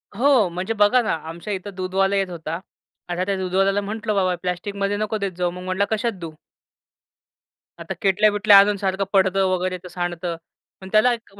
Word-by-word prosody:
हो, 250 -2 +4
म्हणजे 180 +5 -3
बघा 210 +5 +5
ना, 220 - -1 0.2
आमच्या 170 +5 -6
इथं 195 +1 -6
दूधवाला 190 +1 0
येत 195 -1 0
होता. 165 -1 -5 0.5
आता 175 +1 -1
त्या 200 0 -1
दूधवाल्याला 195 +2 +1
म्हंटलं 215 +1 -3
बाबा, 185 -2 +1
"प्लास्टिकमध्ये 200 +3 -2
नको 215 +1 -2
देत 200 -2 -2
जाऊ." 180 -1 0
मग 180 +1 -9
म्हंटला, 185 +2 0
"कशात 230 +2 -1
देऊ?" 165 -2 -6 1.5
आता - - -5
केटल्या-बिटल्या 205 +1 +5
आणून 200 +1 +3
सारखं 195 0 -1
पडतं 190 0 +3
वगैरे 185 0 -1
तर - - -8
सांडतं 175 -1 -4 0.5
पण. 190 - -9
त्याला 220 +3 +4
एक 230 -4 -10
195 Hz, 175 wpm, -22 LUFS, 185-205 Hz, 1.5 s, बघा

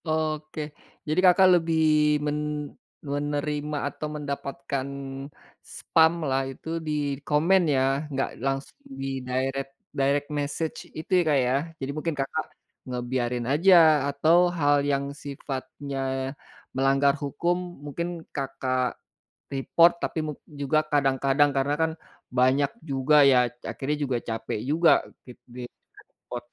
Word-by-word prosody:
Oke. 155 -1 -2 0.5
Jadi 155 +3 +1
Kakak, 185 +1 +7
lebih 165 0 0 0.5
men 150 0 0 0.7
menerima 145 +1 -2
atau 155 - -6
mendapatkan 140 -2 -4 0.9
spam 160 0 +4 0.2
lah 135 0 +2
itu 135 - -11 0.2
di - - -1 0.3
komen 165 +6 +3
ya, 130 - +3 0.3
enggak 135 -1 -1 0.2
langsung 135 0 -2 0.2
di - - -3 0.2
direct 135 +2 -2 0.3
direct 140 +1 +1
message 145 +3 -3 0.2
itu 155 - -8
ya - - +1
Kak, 145 - +4
ya. 125 - +1 0.3
Jadi, 135 +1 -3
mungkin 160 0 -2
Kakak, 135 +3 -2 0.4
ngebiarin 125 -1 -2
aja, 180 +6 +6 0.3
atau 155 +4 +3 0.2
hal 145 -2 +4 0.2
yang 140 0 0
sifatnya 140 -1 -6 0.8
melanggar 135 +1 +3
hukum 170 +5 0 0.3
mungkin 170 +4 -3 0.3
Kakak, 130 -2 -1 0.6
report 165 +5 +4
tapi - - -2
mung 150 -2 -5 0.2
juga 145 +2 +2
kadang-kadang, 135 0 +3
karena 140 +2 +1
kan 160 0 +2 0.5
banyak 135 +3 +3 0.2
juga 135 +2 +2 0.2
ya, 130 - +5 0.3
akhirnya 145 +2 -2
juga 130 -3 0
capek 115 -1 -3
juga 165 +2 +4 0.4
kit 125 - -12 0.7
di-report. 120 0 -9
140 Hz, 120 wpm, -26 LUFS, 135-155 Hz, 0.9 s, Kakak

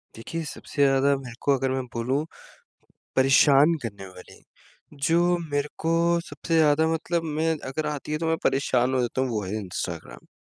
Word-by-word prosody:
देखिए, 165 +9 -5
सबसे 150 -1 -5
ज़्यादा 135 +1 +3
मेरे 125 -3 -9
को 140 - +3
अगर 130 0 -1
मैं 130 0 -1
बोलूँ 130 +6 -1 0.9
परेशान 135 +3 +5
करने 100 -4 -6
वाली, 90 -1 -14 0.5
जो 170 +5 +2
मेरे 145 0 0
को 165 +1 0 0.3
सबसे 165 - -3
ज़्यादा 155 0 +4
मतलब 165 +1 -1
मैं 160 +1 0 0.2
अगर 150 +4 -3
आती 150 0 -5
है 155 - 0
तो 165 - -2
मैं 160 0 +1
परेशान 130 -2 +1
हो 130 - +2
जाता 120 +2 -1
हूँ, 130 - 0
वो 110 -3 -2
है 95 - -5
इंस्टाग्राम। 90 - -6
140 Hz, 175 wpm, -25 LUFS, 130-160 Hz, 0.9 s, परेशान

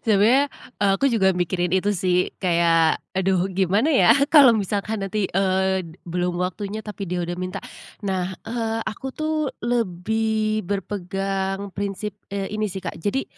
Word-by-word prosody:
sebenarnya 230 +7 +4 0.3
aku 200 +7 +3
juga 195 -6 +3
mikirin 175 0 -1
itu 190 +2 +2
sih, 180 0 +2
kayak, 170 -3 +3 0.2
"Aduh 190 0 +2
gimana 195 - +1
ya 280 - +6 0.2
kalau 285 -7 +8
misalkan 210 0 -1
nanti, 195 +1 -1
eee, 190 0 +1 0.2
belum 175 0 -2
waktunya 200 +4 -3
tapi 205 -3 -6
dia 175 0 -1
udah 175 +1 -3
minta." 185 0 -4 0.4
Nah, 190 -1 -1
eee, 225 0 -2
aku 265 +5 -5
tuh 310 -1 -1 0.2
lebih 220 0 0
berpegang 195 0 -3
prinsip, 200 +1 -3 0.2
eee, 200 0 -4
ini 215 0 -1
sih, 190 0 -6
Kak. 170 - -5
Jadi, 205 +10 -1
195 Hz, 145 wpm, -23 LUFS, 185-215 Hz, 0.4 s, kalau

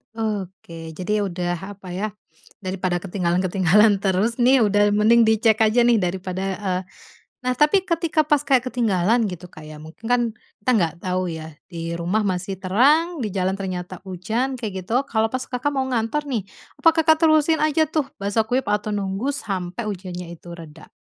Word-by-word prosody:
Oke, 185 -7 -5
jadi 205 +3 -1
udah 180 +2 -4
apa 185 -2 -10
ya, 195 +4 -2 0.6
dari 185 0 -4
pada 175 -1 -1
ketinggalan 180 -1 0
ketinggalan 195 +3 +4
terus 200 +5 0
nih, 250 0 +5
udah 205 0 +3
mending 225 +2 +5
dicek 220 0 +3
aja 220 +2 +4
nih 235 -2 +4
dari 180 0 -2
pada 185 0 -3
eee, 185 -3 -2 0.6
nah 255 0 +1
tapi 300 +8 +3
ketika 330 -3 +1
pas 295 -2 +3
kayak 260 -3 +2
ketinggalan 225 -2 +1
gitu 180 0 -8
Kak 155 -3 -14
ya, 155 0 -10
mungkin 160 +8 -13
kan 245 -1 +4 0.4
kita 235 +5 -1
nggak 170 -6 +1
tahu 185 -1 -1
ya 160 -1 -7 0.2
di 165 0 -4
rumah 185 +5 0
masih 185 0 -2
terang, 285 - +2
di 210 - -2
jalan 190 0 0
ternyata 185 -2 -5
hujan, 220 +8 -2
kayak 195 -5 -4
gitu. 250 +9 0
Kalau 220 -2 0
pas 255 0 -3
Kakak 255 +3 -2
mau 265 -2 -1
ngantor 255 +4 -1
nih, 240 -7 -1 0.4
apakah 325 -1 +4
Kakak 315 +1 +4
terusin 310 0 +4
aja 310 +1 +3
tuh 300 -2 -2
basah 205 +3 +1
kuyup 250 +4 -1
atau 210 +1 0
nunggu 200 +5 -2
sampai 200 - -4
ujannya 180 -3 -6
itu 170 +1 -14
reda? 160 -2 -11
205 Hz, 180 wpm, -22 LUFS, 180-250 Hz, 0.6 s, nih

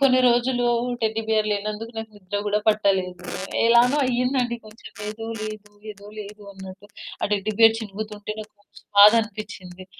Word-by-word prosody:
కొన్ని 255 -2 +5
రోజులు 245 0 +2 0.3
teddy 220 0 0
bear 215 -1 +2
లేనందుకు 210 +3 -3
నాకు 225 0 -5
నిద్ర 205 0 -4
గూడా 205 0 +2
పట్టలేదు. 190 -4 +1 0.4
ఎలానో 240 +4 +5
అయిందండి 250 -1 0
కొంచెం 215 +1 -13 0.2
ఏదో 220 +1 -6 0.2
లేదు 215 -1 -7 0.2
ఏదో 200 0 -16
లేదు 210 +1 -10
అన్నట్టు 190 +1 -11 0.3
ఆ - - +2
టెడ్డీ 210 +1 -1
బేర్ 225 0 +7
చినుగుతుంటే 210 0 -6
నాకు 215 0 -11
మస్తు 205 - -20
బాధనిపిచ్చింది. 205 -4 +3
215 Hz, 145 wpm, -23 LUFS, 205-230 Hz, 0.4 s, బేర్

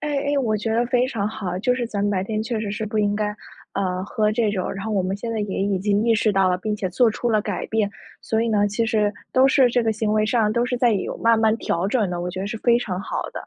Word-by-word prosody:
哎 300 - -3
哎， 285 +1 -1
我 215 -3 +1
觉 220 +2 -2
得 235 +2 +2
非 245 +1 +2
常 215 -6 -2
好 210 -3 -5
啊， 180 - -3
就 250 +4 +2
是 245 -2 -2
咱 205 -3 -4
们 205 - +1
白 190 -1 0
天 215 0 -2
确 225 0 -2
实 205 -2 -3
是 215 +1 -3
不 215 0 -3
应 205 -1 +2
该， 210 0 0 0.5
呃， 185 -1 -1
喝 210 +1 0
这 220 -1 +1
种 190 -3 -2
然 195 +1 -6
后 220 - -3
我 200 - +2
们 190 +2 -2
现 230 +3 -5
在 225 - -2
也 205 -2 -3
已 200 -1 0
经 205 +2 +1
意 230 - +4
识 215 -1 +2
到 190 -1 +3
了， 180 - 0
并 215 +1 -2
且 195 -3 -3
做 230 +6 +3
出 235 +2 -2
了 215 - +3
改 205 -3 -3
变。 220 -2 0 0.3
所 220 0 0
以 230 - 0
呢， 205 -2 +2
其 215 +3 -1
实 215 -2 +1 0.2
都 260 +1 +5
是 270 -2 +5
这 245 +1 +1
个 225 - +1
行 215 0 -1
为 215 0 +2
上 220 -2 +2
都 235 +2 +1
是 245 - -1
在 240 -1 +3
有 200 - -2
慢 230 0 +3
慢 220 0 +3
调 175 -3 -1
整 210 -4 0
的， 175 -1 -3
我 175 - -3
觉 185 - -5
得 195 - -3
是 225 - -5
非 235 0 +3
常 185 -6 -3
好 - - -3
的。 - - -7
215 Hz, 330 characters per minute, -22 LUFS, 200-230 Hz, 0.5 s, 都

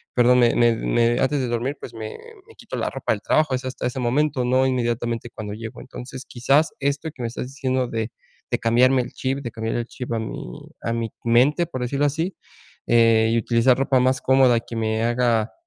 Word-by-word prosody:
perdón, 125 0 +5
me 120 -1 +4
me 120 -1 +4
me 120 +1 +1
antes 140 +2 +1
de 130 - -1
dormir, 120 +4 -2
pues, 120 - -9
me 110 -1 -6 0.4
me 450 - -17
quito - - -7
la - - -1
ropa - - -3
del - - -6
trabajo, 155 -3 +2
es 130 +1 -5
hasta 130 - -4
ese 130 +1 -4
momento, 130 +2 +1
no 130 +2 +3
inmediatamente 120 -2 -1
cuando 105 -2 -7
llego. 110 +1 -8
Entonces, 130 0 -9
quizás 140 +6 +2
esto 145 +3 -1
que 125 - -10
me - - -1
estás 125 +1 -5
diciendo 130 -2 -1
de 115 0 -3 0.4
de - - +1
cambiarme 125 +3 +4
el 120 - -7
chip, 135 +1 -2
de 125 -4 -5
cambiar 110 0 -3
el 120 - -2
chip 125 -2 -7
a 115 - 0
mi 85 - -7 0.2
a 115 - -2
mi 115 -1 -2
mente, 130 +8 +3
por 130 -5 -6
decirlo 140 +4 0
así, 160 +6 -1 0.5
eh, 115 -1 +4
y 115 - +2
utilizar 120 +2 +3
ropa 135 -1 +2
más 130 +1 +2
cómoda 130 -3 +4
que 120 - -9
me 110 0 -1
haga, 120 -2 +1
125 Hz, 215 wpm, -23 LUFS, 115-130 Hz, 0.5 s, perdón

